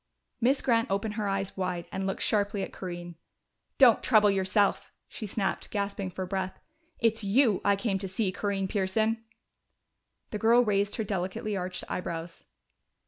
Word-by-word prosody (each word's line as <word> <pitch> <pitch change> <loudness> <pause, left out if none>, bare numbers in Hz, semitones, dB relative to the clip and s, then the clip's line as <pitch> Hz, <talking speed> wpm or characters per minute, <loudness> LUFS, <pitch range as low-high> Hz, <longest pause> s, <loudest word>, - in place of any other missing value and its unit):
Miss 265 +4 +3
Grant 230 -2 +2
opened 200 +2 -1
her 210 -1 -2
eyes 195 0 -2
wide 180 -2 -2
and 190 0 -2
looked 195 - -2
sharply 205 -1 +1
at - - -6
Corinne. 175 -2 -7 0.6
"Don't 245 -5 +7
trouble 210 -4 +5
yourself!" 195 +1 +1 0.2
she 215 - -6
snapped, 195 0 -2
gasping 200 -2 -2
for 185 +1 -4
breath. 190 0 -3 0.4
"It's 225 -2 +1
you 215 0 +3
I 200 0 +4
came 200 -1 -1
to 195 - -3
see, 190 +1 0
Corinne 195 0 -1
Pearson!" 215 +4 0 1.1
The 210 - -3
girl 235 +3 +5
raised 200 -1 +1
her 225 - -1
delicately 205 +2 -2
arched 185 -1 -4
eyebrows. 165 -1 -5
200 Hz, 155 wpm, -29 LUFS, 190-220 Hz, 1.1 s, Don't